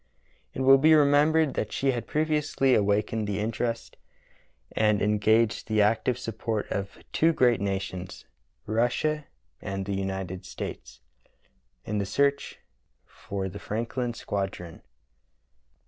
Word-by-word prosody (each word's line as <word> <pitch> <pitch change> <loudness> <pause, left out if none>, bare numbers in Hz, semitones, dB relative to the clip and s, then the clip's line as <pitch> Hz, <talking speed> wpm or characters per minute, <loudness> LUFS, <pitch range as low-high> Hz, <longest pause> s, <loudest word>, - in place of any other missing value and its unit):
It - - -3
will 135 +1 +7
be 155 +3 +6
remembered 150 +1 +4
that 105 - -3
she 135 0 +1
had 120 -3 -4
previously 150 -3 +1
awakened 105 +1 +1
the 100 -1 -2
interest 115 +2 -3 0.7
and 105 -1 +2
en 105 +1 +1
gaged 110 +2 +2
the 110 -1 +3
active 115 +3 +1
support 115 -2 -3
of 100 0 -4 0.2
two 165 +1 +4
great 120 -7 +3
nations 95 -2 -4 0.2
— - - -47
Russia 125 +7 0 0.3
and 95 0 -4
the 100 - -3
United 95 -1 -4
States - - -8 0.4
— - - -41
in 105 0 -2
the 100 - -2
search 140 +5 0 0.5
for 95 +7 -5
the 100 +2 -8
Franklin 120 +2 -3
squadron. 95 -6 -4
110 Hz, 130 wpm, -27 LUFS, 100-130 Hz, 0.7 s, will